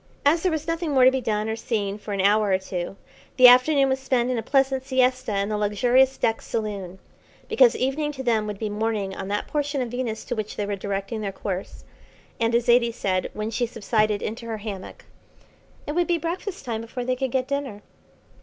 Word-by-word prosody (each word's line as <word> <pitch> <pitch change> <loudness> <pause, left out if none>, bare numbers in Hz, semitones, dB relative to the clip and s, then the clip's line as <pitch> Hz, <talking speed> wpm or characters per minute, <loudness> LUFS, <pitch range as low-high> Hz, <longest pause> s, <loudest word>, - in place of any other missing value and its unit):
As 320 +4 +4
there 370 - +1
was 315 -1 -2
nothing 330 -2 -2
more 260 -2 +6
to 260 - +7
be 265 0 -1
done 215 -2 -1
or 220 - -1
seen 210 -3 -2
for 210 - -8
an 200 -1 0
hour 205 +1 +3
or 190 - +3
two, 190 -1 -5 0.4
the 255 -1 +10
afternoon 270 +3 +6
was 265 0 0
spent 255 -2 0
in 250 - -1
a - - -2
pleasant 270 +2 +1
siesta 255 -4 +1
in 200 +1 0
the 210 -1 -1
luxurious 245 +6 +3
deck 225 0 0
saloon; 200 -5 -4 0.5
because 470 +1 +5
evening 285 +4 -1
to 265 -2 -6
them 225 -4 +1
would 210 -1 -4
be 215 - -3
morning 210 -2 -2
on 190 - -5
that 205 +1 -2
portion 290 -1 -1
of 250 -2 -2
Venus 245 -3 -3
to 245 - -3
which 215 -1 -4
they 205 - -2
were 205 0 -2
directing 200 +3 -4
their 200 -2 -3
course, 190 -1 -5 0.6
and, 230 0 +1
as 235 0 +2
Zaidie 240 -1 +4
said, 185 -4 -1
when 215 +1 -3
she 240 +1 0
subsided 215 -2 0
into 230 +2 -5
her 225 -1 -3
hammock: 205 -3 -8 0.8
It - - -3
would 345 +3 +1
be 345 -1 +2
breakfast 360 +2 -5
time 225 -2 -3
before 240 +2 -6
they 255 0 0
could 265 +1 -2
get 255 +1 -1
dinner. 275 -7 -4
235 Hz, 220 wpm, -24 LUFS, 210-265 Hz, 0.8 s, the